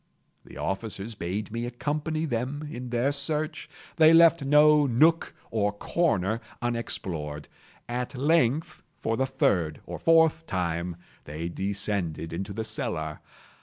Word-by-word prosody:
The - - -13
officers 100 +2 -3
bade 100 +2 -4
me 115 +2 -3
accompany 150 +5 -2
them 140 +3 -3
in 125 +1 -6
their 120 +3 +1
search. 150 +2 0 0.3
They 160 0 +7
left 165 -2 +6
no 150 +1 +5
nook 155 +7 +3 0.2
or 105 -2 +1
corner 110 - 0 0.2
unexplored. 90 -11 -3 0.4
At 125 +2 -4
length, 145 0 +1 0.2
for 115 - -1
the 130 +3 0
third 90 - +1
or - - -7
fourth 165 0 +4
time, 85 -1 -2 0.3
they 80 +3 -5
descended 95 -4 -2
into 95 +4 -4
the 110 +3 -3
cellar. 80 -7 -4
120 Hz, 130 wpm, -27 LUFS, 95-150 Hz, 0.4 s, They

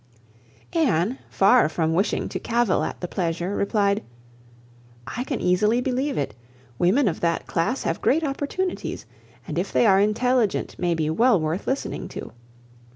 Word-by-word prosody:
Anne, 250 - +1
far 210 -1 +4
from 160 0 0
wishing 190 +6 0
to - - -4
cavil 235 -4 +1
at - - -4
the 180 - -3
pleasure, 175 +2 -2
replied, 200 0 +1 1.0
"I 245 - -4
can 270 -1 -3
easily 210 +6 +2
believe 260 +3 -1
it. 140 -7 -2 0.5
Women 215 +9 +3
of 170 - -1
that 170 -1 0
class 175 +11 -1
have - - -2
great 320 +5 +2
opportunities, 300 +6 -3 0.4
and - - -2
if - - -3
they - - +3
are 195 -2 +5
intelligent 220 +2 +1
may 175 -1 +1
be 155 -1 0
well 230 +4 +4
worth 155 +4 -2
listening 270 +1 -2
to. - - -8
205 Hz, 155 wpm, -24 LUFS, 175-255 Hz, 1.0 s, are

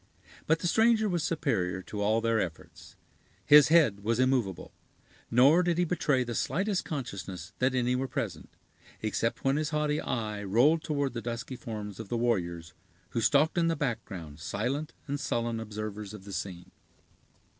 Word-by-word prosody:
But 160 - +4
the 175 - 0
stranger 220 +3 +4
was 175 -5 0
superior 95 - -1
to 105 +2 -5
all 110 +2 +2
their 115 -1 +2
efforts. 85 -5 -6 0.5
His 150 -1 +8
head 150 -11 +4
was 115 +2 0
immovable; 125 -9 0 0.6
nor 135 +9 +6
did 175 -2 +1
he 175 - +3
betray 150 -6 +1
the 120 -1 -5
slightest 195 - 0
consciousness 100 - -6
that 130 0 +2
any 125 0 +1
were 130 +1 -1
present, - - -4 0.5
except 110 +2 -1
when 135 +1 +2
his 155 0 -1
haughty 150 -1 0
eye 105 -3 -3
rolled 125 +12 +3
toward 145 -4 -1
the 120 - -4
dusky 120 +2 -5
forms 105 -4 -7
of 110 -3 -7
the 120 - -1
warriors, 85 -8 -1 0.4
who 115 - -2
stalked 150 +7 +3
in 165 - +3
the 165 - +1
background 100 - -4
silent 125 - -2
and 145 0 -3
sullen 115 -3 -1
observers 105 -1 -6
of 100 - -11
the 100 0 -9
scene. 90 -3 -6
120 Hz, 165 wpm, -29 LUFS, 105-150 Hz, 0.6 s, His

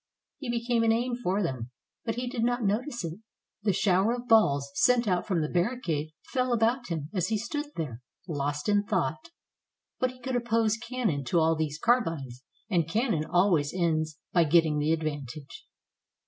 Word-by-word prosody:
He 270 -4 -5
became 235 0 +1
an 225 0 +4
aim 240 +2 0
for 205 -4 0
them, 130 -7 -3 0.4
but 225 - -1
he 245 +1 -3
did 245 -2 -2
not 245 0 +1
notice 225 - -1
it. 165 +4 -6 0.4
The 205 -1 +2
shower 195 +4 +2
of 245 0 -8
balls 140 - +4
sent 240 - +3
out 180 -2 +1
from 175 -6 +1
the - - -1
barricade 175 - -1
fell 255 -2 0
about 240 +2 +1
him 160 -3 -4
as 185 -3 0
he 220 - 0
stood 290 +7 -3
there, 130 -7 -4 0.3
lost 145 -2 -2
in 205 -1 +3
thought. 200 - -1 0.7
But 255 - +2
he 255 0 -13
could 255 +1 -3
oppose 230 -2 +2
cannon 230 - -2
to 150 - +1
all 160 0 +3
these 155 -2 -2
carbines, 165 - 0 0.2
and 170 -6 +1
cannon 210 - +1
always 175 -5 +2
ends 160 -3 0 0.2
by 170 -2 +5
getting 160 -1 +3
the 150 +2 +1
advantage. 150 -3 -4
190 Hz, 175 wpm, -28 LUFS, 155-235 Hz, 0.7 s, by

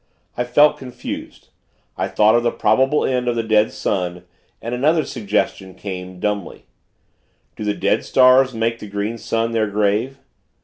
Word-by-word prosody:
I 125 - -1
felt 145 +5 +4
confused. 125 -2 -8 0.5
I - - -2
thought 105 +1 +3
of 120 - +4
the 120 - +1
probable 130 +7 +2
end 125 -1 -1
of 120 - +1
the 115 - -1
dead 110 -1 +2
sun, 90 -2 -3 0.4
and 115 - -5
another 150 +5 +2
suggestion 100 -5 -2
came, 95 -2 -7
dumbly 105 -2 -3 0.9
Do - - -6
the 105 -1 -1
dead - - +1
stars 130 0 +5
make 115 0 -2
the 105 - -8
Green 105 +3 -4
Sun 115 +1 -1
their 110 -1 +1
grave? 105 +6 0
115 Hz, 160 wpm, -20 LUFS, 105-125 Hz, 0.9 s, stars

